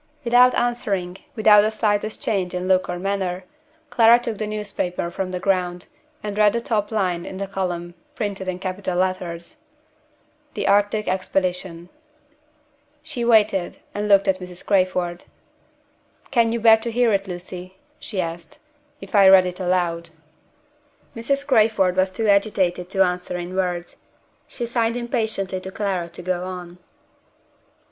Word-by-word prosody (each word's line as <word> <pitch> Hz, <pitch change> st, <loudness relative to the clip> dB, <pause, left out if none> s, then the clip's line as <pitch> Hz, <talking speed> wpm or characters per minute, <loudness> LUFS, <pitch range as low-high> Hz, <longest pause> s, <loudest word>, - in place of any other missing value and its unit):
Without 245 Hz, +1 st, +5 dB
answering, 195 Hz, -7 st, -1 dB, 0.2 s
without 210 Hz, -2 st, +6 dB
the 215 Hz, -, +1 dB
slightest 215 Hz, -1 st, -1 dB
change 185 Hz, -5 st, -1 dB
in 180 Hz, +1 st, -3 dB
look 185 Hz, -1 st, +2 dB
or 175 Hz, -, -2 dB
manner, 190 Hz, -1 st, -2 dB, 0.5 s
Clara 230 Hz, 0 st, +6 dB
took 235 Hz, -3 st, -5 dB
the 215 Hz, -, -2 dB
newspaper 200 Hz, -5 st, -3 dB
from 190 Hz, +1 st, -3 dB
the 180 Hz, 0 st, -4 dB
ground, 180 Hz, -2 st, -1 dB, 0.4 s
and 210 Hz, 0 st, -4 dB
read 210 Hz, -1 st, +5 dB
the 235 Hz, -, 0 dB
top 215 Hz, -3 st, -1 dB
line 185 Hz, -5 st, 0 dB
in 190 Hz, -, -7 dB
the 195 Hz, -, -3 dB
column, 180 Hz, -3 st, -4 dB, 0.2 s
printed 200 Hz, -4 st, -4 dB
in 185 Hz, -1 st, -2 dB
capital 185 Hz, -1 st, -3 dB
letters: 185 Hz, -, -3 dB, 1.0 s
THE -, -, -2 dB
ARCTIC 205 Hz, +1 st, +2 dB
EXPEDITION. 185 Hz, -2 st, -2 dB, 1.1 s
She 305 Hz, -6 st, -4 dB
waited, 215 Hz, -6 st, +3 dB, 0.2 s
and 205 Hz, +1 st, -2 dB
looked 200 Hz, -1 st, +5 dB
at 190 Hz, -1 st, +2 dB
Mrs. 180 Hz, -1 st, -10 dB
Crayford. 185 Hz, -3 st, 0 dB, 1.1 s
"Can 235 Hz, -3 st, +3 dB
you 235 Hz, -, -1 dB
bear 225 Hz, 0 st, +7 dB
to 225 Hz, +2 st, -4 dB
hear 235 Hz, -1 st, +2 dB
it, 195 Hz, 0 st, 0 dB
Lucy," 180 Hz, +1 st, -8 dB, 0.2 s
she 205 Hz, -9 st, -5 dB
asked, 165 Hz, -1 st, -5 dB, 0.4 s
"if 195 Hz, -, -11 dB
I 200 Hz, -2 st, +6 dB
read 190 Hz, -1 st, +7 dB
it 180 Hz, +1 st, -5 dB
aloud?" 175 Hz, -2 st, -1 dB, 1.1 s
Mrs. 275 Hz, +5 st, -1 dB
Crayford 215 Hz, -8 st, +3 dB
was 185 Hz, 0 st, +2 dB
too 215 Hz, +4 st, -2 dB
agitated 195 Hz, -3 st, +1 dB
to 195 Hz, -1 st, +3 dB
answer 180 Hz, 0 st, -3 dB
in 175 Hz, +1 st, -6 dB
words. 180 Hz, -2 st, -2 dB, 0.5 s
She 240 Hz, -, -4 dB
signed 235 Hz, 0 st, 0 dB
impatiently 220 Hz, -6 st, -2 dB
to 190 Hz, -, -7 dB
Clara 190 Hz, -4 st, -2 dB
to 170 Hz, -, -10 dB
go 180 Hz, 0 st, -2 dB
on. 180 Hz, -1 st, -8 dB
190 Hz, 150 wpm, -22 LUFS, 180-215 Hz, 1.1 s, bear